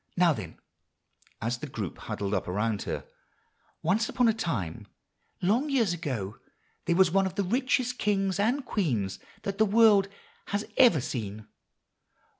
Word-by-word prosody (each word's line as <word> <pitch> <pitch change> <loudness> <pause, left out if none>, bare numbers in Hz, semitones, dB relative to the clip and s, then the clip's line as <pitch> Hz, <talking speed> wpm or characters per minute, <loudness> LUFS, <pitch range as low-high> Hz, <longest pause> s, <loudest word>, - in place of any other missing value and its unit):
Now, 175 -2 +5
then," - - -7 0.9
as 120 +2 -1
the 150 - -5
group 105 - -5
huddled 100 0 -3
up 95 - -1
around 105 +3 -1
her. - - -3 0.8
"Once 210 +7 +2
upon 250 -2 +2
a 225 - +4
time, 165 - -3 0.6
long 235 +11 +2
years 235 -10 +2
ago, 130 - -4 0.5
there 170 - +2
was 185 -2 +5
one 195 +1 +3
of 190 - -7
the 200 - +1
richest 250 +4 0
kings 195 -2 +1
and 250 +7 +1
queens 120 - -1 0.2
that 200 0 -4
the 220 - +6
world 205 -2 +5 0.4
has 205 +1 -2
ever 235 - +6
seen. 110 -4 -5
190 Hz, 150 wpm, -28 LUFS, -, 0.9 s, the